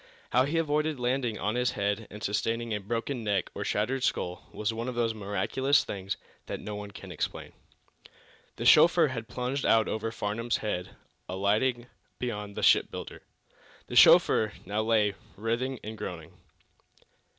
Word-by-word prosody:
How 125 +1 +4
he 155 +4 -1
avoided 150 -2 0
landing 125 -2 0
on 105 - -1
his 125 0 +1
head 100 +1 -1
and 105 +1 -10
sustaining 115 +3 -1
a 105 - -1
broken 115 +4 -3
neck 100 -3 0
or - - -4
shattered 125 +5 -1
skull 90 -7 -2
was 105 +1 -2
one 115 +2 -4
of 125 - -5
those 115 -1 +1
miraculous 110 +7 +1
things 100 0 -4 0.3
that - - -4
no 105 - -6
one 105 0 -6
can 100 - -10
explain. - - -4 1.0
The - - -5
chauffeur 170 -2 +7
had 115 -3 -5
plunged 125 +3 -3
out 110 -1 +4
over 110 +1 -2
Farnum's 115 +2 -2
head, 90 -4 -4 0.3
alighting 105 +6 +1 0.3
beyond 105 -4 -4
the - - -3
shipbuilder. - - +2 0.6
The - - -7
chauffeur 110 -1 +6
now 105 +3 -1
lay 110 -2 +2 0.2
writhing 120 +4 -2
and 110 +1 -6
groaning. 90 -7 -7
110 Hz, 155 wpm, -29 LUFS, 105-125 Hz, 1.0 s, chauffeur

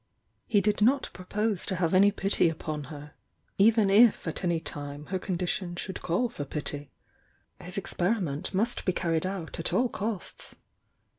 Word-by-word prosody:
He 210 -4 +3
did 210 0 +1
not 260 +5 +3
pro 185 - -10
pose 210 0 0
to 190 - 0
have 170 -1 0
any 195 +2 +7
pity 195 -3 +2
upon 155 -2 -4
her, 145 +1 -10 0.5
even 215 -1 +5
if 220 -2 +5
at 165 - -3
any 170 -2 +1
time 145 -1 -6
her 190 - 0
condition 180 -1 -2
should 190 +1 -5
call 180 +9 +1
for 150 - -6
pity. 145 0 -3 0.7
His 180 +2 -8
experiment 180 -4 -1
must 220 +6 0
be 185 - +1
carried 165 0 0
out 185 -5 -5
at 165 - 0
all 250 0 +3
costs. 210 -3 -4
185 Hz, 165 wpm, -28 LUFS, 160-205 Hz, 0.7 s, any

